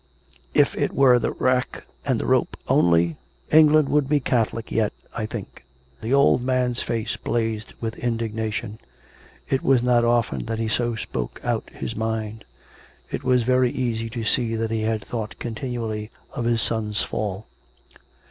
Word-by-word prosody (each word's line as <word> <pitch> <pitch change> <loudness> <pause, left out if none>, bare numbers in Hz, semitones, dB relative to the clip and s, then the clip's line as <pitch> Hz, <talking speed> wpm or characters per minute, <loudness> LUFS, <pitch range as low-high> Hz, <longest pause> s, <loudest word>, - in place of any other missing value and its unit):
If - - +4
it - - -1
were 130 -3 +6
the - - 0
rack 130 0 0 0.2
and - - +1
the - - -2
rope - - +1
only, 85 -1 +3 0.3
England 155 -1 +6
would 145 -2 +2
be 150 0 +4
Catholic, 115 -3 -1
yet, 110 -2 +1 0.2
I 110 -1 -2
think." 110 - -8 0.4
The 110 - -3
old 140 -2 +5
man's 125 -1 +1
face 115 -2 -2
blazed 110 -2 -2
with 110 -1 -4
indignation; 110 -2 -2 0.7
it 135 - +1
was 130 -3 +3
not 120 -1 +4
often 115 - +1
that 115 - -2
he 110 0 -1
so 120 0 0
spoke 65 - -4
out - - -1
his - - -6
mind. 110 0 -3 0.7
It - - -3
was 125 -2 +3
very 130 +1 +3
easy 115 -3 -2
to 115 -1 -4
see 115 +1 +1
that 110 0 -1
he 110 -1 0
had 110 -1 -1
thought 110 -3 -5
continually 115 -2 -4 0.2
of 120 - -3
his 115 -1 +2
son's 105 -2 0
fall. 105 0 -3
115 Hz, 160 wpm, -24 LUFS, 110-125 Hz, 0.7 s, were